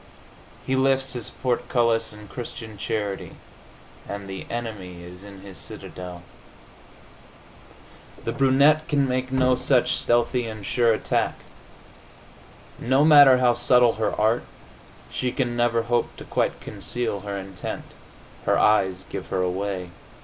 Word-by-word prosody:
He 130 - 0
lifts 135 0 +2
his 120 -4 -5
portcullis 120 -2 0
in 105 0 -12
Christian 115 -1 -8
charity 100 -1 -3 0.8
and 100 -1 -5
the 95 0 -7
enemy 100 -7 -6
is 90 +2 -11
in 100 -1 -11
his 95 -1 -11
citadel. 90 -1 -9 2.0
The - - -2
brunette 140 +3 +4
can 145 -3 +2
make 130 0 -2
no 130 -1 +3
such 125 0 +2
stealthy 120 0 +1
and 110 -2 -7
sure 120 -2 +3
attack. 110 - 0 1.4
No 130 +4 +3
matter 145 -4 +8
how 125 -1 +4
subtle 120 0 +4
her 105 - 0
art, 110 +3 +3 0.7
she 125 -1 -1
can 120 -3 -1
never 120 -1 +2
hope 120 +1 0
to - - -8
quite - - -1
conceal 120 -4 -3
her 100 0 -5
intent. 95 -1 -6 0.6
Her - - +4
eyes 95 -3 +2
give - - -6
her 95 - -1
away. 90 -1 -3
115 Hz, 130 wpm, -24 LUFS, 100-125 Hz, 2.0 s, matter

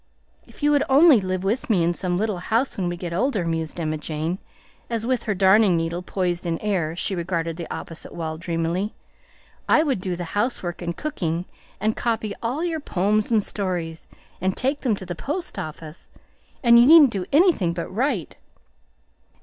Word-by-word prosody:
"If - - -15
you 295 - +4
would 290 -1 +4
only 280 -3 +7
live 185 0 -2
with 220 +7 -1
me 190 -6 +3
in 170 +1 +2
some 175 0 -1
little 210 -2 -1
house 230 +8 0
when 180 -3 -1
we 175 - -4
get 170 -1 -5
older," 200 -1 0
mused 165 0 -3
Emma 155 -2 -2
Jane, 160 +4 -3 0.5
as 230 -1 -2
with 250 -1 +1
her 210 - 0
darning 190 0 +5
needle 165 +1 -2
poised 180 -1 -2
in 165 -1 0
air 175 -6 -1
she 190 - -2
regarded 170 -2 -2
the 170 -1 -7
opposite 165 - -7
wall 160 -2 -5
dreamily, 170 +4 -2 0.7
"I 310 - +5
would 270 - -1
do 185 -1 -2
the 175 - -5
housework 205 -5 -1
and 170 -1 -4
cooking, 175 - -2 0.3
and 215 +1 0
copy 225 -3 -1
all 250 +8 -2
your 330 -2 -1
poems 210 -4 0
and 220 -3 +3
stories, 175 -6 -4 0.3
and 190 +1 0
take 275 +3 0
them 240 -6 +1
to 190 - -8
the 175 - -4
post 300 - -4
office, 155 +1 -8 0.5
and 235 -1 +7
you 240 - +7
needn't 305 -4 +8
do 190 -3 -3
anything 295 - +4
but 170 0 -4
write. 235 - -1
190 Hz, 185 wpm, -23 LUFS, 170-235 Hz, 0.7 s, needn't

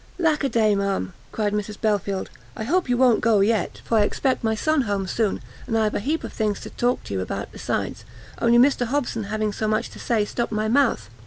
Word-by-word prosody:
"Lack 320 -5 +2
a 275 - +2
day, 220 -3 +3
ma'am," 200 -2 -1 0.2
cried 210 -2 -1
Mrs 210 0 -3
Belfield, 200 -3 -1 0.3
"I 220 - -3
hope 345 +5 +1
you 245 - +2
won't 250 -3 +4
go 220 -3 +4
yet, 210 -2 +1
for 225 - +2
I - - +5
expect 260 +5 0
my 220 -1 +1
son 310 +5 +2
home 200 -1 0
soon, 210 +2 -1 0.2
and 225 -2 0
I've 215 -1 +1
a - - 0
heap 300 +10 -1
of - - -6
things 210 -3 -1
to - - -8
talk 245 +1 0
to - - -7
you 95 - -1
about 95 - -4
besides, - - -3 0.4
only 235 0 +5
Mr 250 -1 +4
Hobson 245 -5 -1
having 215 0 -1
so 215 - -2
much 215 +2 0
to - - -11
say 220 -3 +1
stopt 235 +2 -3
my 215 0 0
mouth. 240 - +2
220 Hz, 230 wpm, -23 LUFS, 205-245 Hz, 0.4 s, I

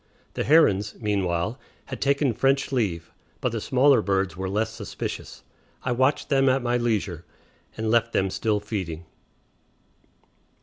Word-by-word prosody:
The - - -2
herons, 105 -10 +4
meanwhile, 100 +1 -1 0.3
had - - -7
taken 140 -2 +2
French 135 +4 +1
leave, 95 -10 -1 0.3
but 125 - -1
the 115 -1 -3
smaller 130 0 +4
birds 95 -2 0
were 95 +1 -4
less 110 +3 -1
suspicious; 105 -5 -6 0.4
I 125 - -1
watched 130 +4 +1
them 135 -2 +4
at 130 0 +1
my 120 0 +1
leisure, 105 -8 -1 0.5
and 110 0 -1
left 115 0 +2
them 95 -3 0
still 105 0 0
feeding. 95 -6 -5
110 Hz, 140 wpm, -25 LUFS, 95-130 Hz, 0.5 s, herons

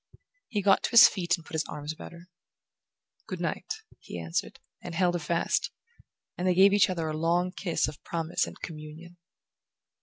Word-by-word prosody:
He 210 -6 -2
got 195 0 +5
to - - -1
his 235 -1 +10
feet 180 -1 0
and 165 - -15
put - - -14
his 160 0 0
arms 150 +1 -6
about - - -10
her. 170 +1 -14 1.0
"Good - - -5
night," - - -3 0.3
he 85 - -8
answered, 80 0 -3 0.2
and 175 - -7
held 175 0 +2
her 175 - -1
fast; 170 +2 0 0.7
and 180 - -2
they 180 - +3
gave 195 +2 +6
each 205 -1 +5
other 170 -3 -2
a 155 - -3
long 170 +3 +1
kiss 180 -3 -1
of 150 -1 -9
promise 165 -1 -1
and - - -10
communion. 160 +2 -9
170 Hz, 185 wpm, -28 LUFS, 160-180 Hz, 1.0 s, his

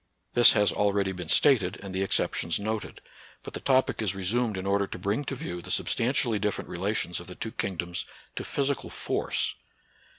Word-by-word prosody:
This 120 - +8
has 105 - +3
already 100 -1 +1
been 90 -3 -7
stated, 110 -11 +4
and 95 -1 -7
the 95 - -1
exceptions 90 -3 +1
noted; 110 +1 -4 0.4
but - - -8
the - - -4
topic 130 -3 +2
is 100 -3 0
resumed 105 +3 0
in 95 - -4
order 100 0 +1
to - - -7
bring 100 +9 -1
to 135 - -3
view 90 -8 -5
the - - -11
substantially 120 -2 +1
different 105 0 -2
relations 90 -1 -1
of 85 - -11
the 90 - -8
two 110 - -5
kingdoms 90 -6 -3 0.3
to - - -3
physical 140 0 -1
force. - - -1
100 Hz, 185 wpm, -28 LUFS, 95-115 Hz, 0.4 s, This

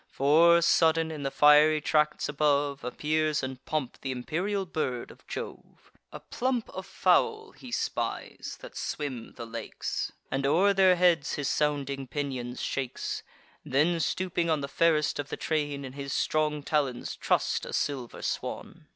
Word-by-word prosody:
For, 165 +5 +5
sudden, 165 -1 +3
in 155 -2 -6
the 135 - -1
fiery 150 +2 +6
tracts 150 0 +1
above, 145 -1 +1
Appears 155 +4 0
in 130 0 -4
pomp 155 -6 -3
th' - - -5
imperial 175 +11 -2
bird 130 -8 -3
of - - -19
Jove: - - -8 0.2
A - - -8
plump 250 -2 -2
of 190 0 -7
fowl 440 - +2
he 255 - -12
spies, - - -3
that - - -11
swim 130 -6 -4
the 115 - -7
lakes, 115 -1 -4 0.2
And 135 +1 -1
o'er 195 +7 +4
their 190 -2 +5
heads 175 -5 +3
his 145 -2 -2
sounding 140 -2 -1
pinions 130 -3 -4
shakes; 130 -3 -3 0.4
Then, 160 +6 +2
stooping 175 0 -1
on 155 -2 +1
the 140 - -3
fairest 155 0 +2
of 145 0 -4
the - - -4
train, 145 -3 -2
In 130 - -8
his 140 0 -6
strong 150 -1 0
talons 140 -5 -1
truss'd - - 0
a - - -6
silver 130 -5 -3
swan. - - -4
150 Hz, 155 wpm, -28 LUFS, 140-165 Hz, 0.4 s, fiery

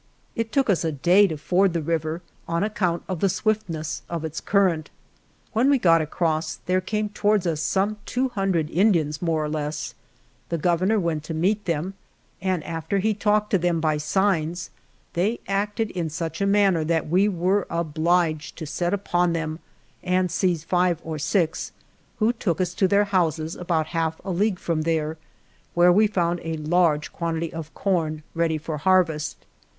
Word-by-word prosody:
It 230 -1 -2
took 275 -1 +2
us 195 -6 +2
a 160 - 0
day 180 +8 +4
to 160 -4 -4
ford 180 +4 +2
the 170 - 0
river 165 +1 -2 0.2
on 170 +2 0
account 185 -5 -1
of 185 -3 -3
the 195 - +2
swiftness 185 -5 -1
of 165 -2 -3
its 160 0 -5
cur 200 -1 +3
rent. 155 -2 -6 0.6
When 240 +5 +3
we 285 - +5
got 165 -8 +4
across, 155 0 -1
there 185 +1 +1
came 210 +1 -2
to 205 0 -4
wards 210 -3 +3
us 160 -3 0
some 200 +5 0
two 255 +1 0
hundred 190 -8 0
Indians, 165 -6 +2
more 165 -3 0
or - - -2
less; 150 0 -3 0.6
the 170 - -1
Governor 180 +6 +2
went 165 -4 -1
to 160 - -4
meet 200 +6 +1
them, 170 +2 -1 0.5
and 185 -4 0
after 165 +3 -2
he 215 +3 +2
talked 210 0 +1
to 195 - +3
them 170 -1 +1
by 155 -1 +1
signs 170 +1 0 0.4
they 205 +7 0
acted 205 +2 -1
in 170 -3 -2
such 165 +3 -4
a 200 - +2
manner 200 -5 +3
that 160 0 0
we 185 +6 +3
were 185 +1 +1
obliged 165 0 0
to 160 - -5
set 175 +5 -1
upon 175 -3 +1
them 160 -1 -3 0.4
and 180 -1 +1
seize 175 -3 0
five 180 -1 +1
or 160 -1 -5
six, 160 +1 0 0.4
who 225 +1 +2
took 190 -8 -1
us 180 -1 0
to 190 - +2
their 205 +1 +3
houses, 165 -5 0
about 170 -3 0
half 160 -1 -1
a 195 - -2
league 195 +2 +1
from 165 -3 -1
there, 160 -1 -1 0.6
where 175 +1 +6
we 210 +4 +5
found 175 -4 0
a 165 0 -3
large 155 -1 +1
quan 170 -1 -2
tity 165 0 -3
of 160 -1 -6
corn 160 -6 -1
ready 165 -1 +1
for 155 0 -5
harvest. 160 -3 +2
175 Hz, 185 wpm, -24 LUFS, 160-195 Hz, 0.6 s, where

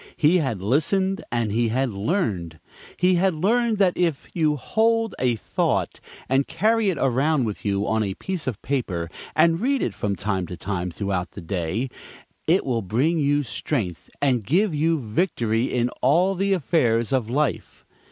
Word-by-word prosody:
He 160 +4 +4
had 120 - -2
listened, 190 - +1
and 115 -3 0
he 115 +2 +1
had 125 +2 0
learned. 100 - -2 0.4
He 180 0 +3
had 190 -3 +2
learned 225 +6 +1
that 190 -3 +3
if 170 -5 -1
you 155 -3 +2
"hold 225 - +1
a 125 -2 +2
thought" 110 - -1 0.3
and 135 +1 +2
carry 220 -1 +2
it 180 - -1
around 135 +3 +2
with 105 -3 -4
you 100 0 0
on 110 0 +1
a 100 -3 -2
piece 185 -7 -4
of 120 -6 -2
paper, 90 - -2 0.2
and 165 +1 +4
read 270 +2 +1
it - - -1
from 100 -3 -2
time 95 -1 -2
to 90 - -7
time 90 -2 -3
throughout 95 0 -3
the - - -8
day, 90 +7 -2 0.6
it 175 +5 +3
will 120 -4 0
bring 130 - +1
you 145 0 +2
strength 100 - -3
and 125 -5 +2
give 175 - +2
you 160 +2 +1
victory 115 - 0
in 125 -2 0
all 170 +9 +3
the 195 +1 0
affairs 125 - +1
of 125 -4 0
life. 145 +3 -2
135 Hz, 170 wpm, -23 LUFS, 110-175 Hz, 0.6 s, He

